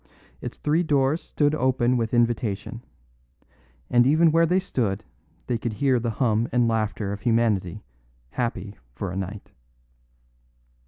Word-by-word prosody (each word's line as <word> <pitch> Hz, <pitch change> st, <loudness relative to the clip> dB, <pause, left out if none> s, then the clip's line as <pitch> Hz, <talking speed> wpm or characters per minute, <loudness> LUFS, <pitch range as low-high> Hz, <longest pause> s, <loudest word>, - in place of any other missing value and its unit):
Its -, -, -6 dB
three 155 Hz, +3 st, +1 dB
doors 145 Hz, -1 st, +1 dB
stood 145 Hz, 0 st, 0 dB
open 130 Hz, -3 st, +2 dB
with 115 Hz, -2 st, -1 dB
invitation; 120 Hz, -1 st, 0 dB, 1.1 s
and 120 Hz, 0 st, +4 dB
even 160 Hz, +3 st, +5 dB
where 165 Hz, +1 st, +4 dB
they 180 Hz, +3 st, +2 dB
stood 110 Hz, -, -1 dB, 0.4 s
they 120 Hz, -2 st, -1 dB
could 115 Hz, -1 st, -3 dB
hear 130 Hz, +2 st, +2 dB
the 115 Hz, 0 st, -2 dB
hum 115 Hz, -1 st, 0 dB
and 120 Hz, -1 st, +3 dB
laughter 110 Hz, -2 st, -1 dB
of 100 Hz, -, -7 dB
humanity 110 Hz, -5 st, +1 dB, 0.5 s
happy 105 Hz, -4 st, -3 dB, 0.2 s
for 95 Hz, +6 st, -4 dB
a -, -, -6 dB
night. 95 Hz, +2 st, -6 dB
120 Hz, 140 wpm, -25 LUFS, 105-135 Hz, 1.1 s, even